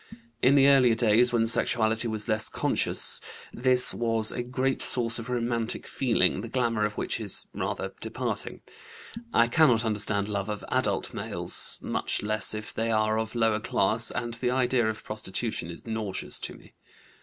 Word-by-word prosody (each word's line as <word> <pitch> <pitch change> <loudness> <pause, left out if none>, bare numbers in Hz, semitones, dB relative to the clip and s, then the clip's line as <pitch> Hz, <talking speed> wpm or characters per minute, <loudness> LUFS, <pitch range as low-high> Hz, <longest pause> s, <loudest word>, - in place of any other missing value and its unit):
In 130 +3 +4
the 140 -1 +6
earlier 130 -4 +5
days, 115 +1 +3
when 115 -2 +2
sexuality 110 0 +1
was 110 -1 0
less 110 -1 0
conscious, - - -2 0.3
this 125 0 +5
was 115 -2 0
a 120 - -4
great 130 +2 -2
source 120 -1 +2
of 115 +2 -8
romantic 120 -2 -2
feeling, 115 -7 +1
the 115 - -7
glamour 115 -4 0
of 105 0 -4
which - - -2
is - - -1
rather - - -4
departing. - - -4 0.7
I 115 - +4
cannot 120 -4 +3
understand 105 -1 0
love 100 -1 -3
of 105 -1 -5
adult - - -1
males, - - +2
much - - -1
less 110 0 +1
if 105 0 -7
they 115 +1 -2
are 110 0 +1
of 110 +1 -5
lower 115 -2 +1
class, 110 +2 +1
and 120 -1 -4
the 125 +1 -2
idea 125 -2 +1
of 110 - -6
prostitution 110 -3 -4
is 85 - -9
nauseous 110 -4 -4
to - - -6
me. - - -18
115 Hz, 165 wpm, -27 LUFS, 110-120 Hz, 0.7 s, the